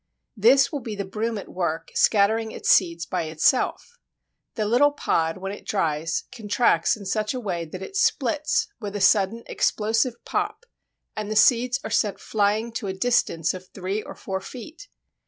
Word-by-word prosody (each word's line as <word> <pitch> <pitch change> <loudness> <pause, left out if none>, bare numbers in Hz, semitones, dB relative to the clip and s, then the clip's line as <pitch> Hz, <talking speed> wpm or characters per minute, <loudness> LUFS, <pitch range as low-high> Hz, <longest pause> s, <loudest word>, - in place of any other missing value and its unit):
This 245 - +5
will 290 - -3
be 230 -4 -6
the 200 -1 -4
Broom 220 +3 -3
at 200 - -7
work 170 -3 -3
scattering 220 +2 +3
its - - 0
seeds 170 -3 +3
by 160 - -2
itself. 250 - 0 0.6
The 215 - -1
little 245 +7 +4
pod, 165 - 0
when 195 +1 -5
it 205 - -9
dries, 165 -4 -1
contracts 220 -6 +1
in 200 - -10
such 215 +5 -1
a - - -2
way 180 -7 -3
that 185 +4 -8
it 390 - -9
splits 305 - +1
with 205 -2 -6
a - - -2
sudden 205 +3 +3
explosive 225 +3 0
pop, 480 - -2 0.5
and 215 -1 -4
the 215 - -2
seeds 245 +3 +4
are - - -5
sent 205 -3 +1
flying 215 +2 0
to 225 -2 -4
a 190 - -2
distance 190 -6 +1
of 185 0 -9
three 195 +3 -4
or - - -10
four 190 -1 -4
feet. 295 - -10
210 Hz, 175 wpm, -24 LUFS, 190-235 Hz, 0.6 s, This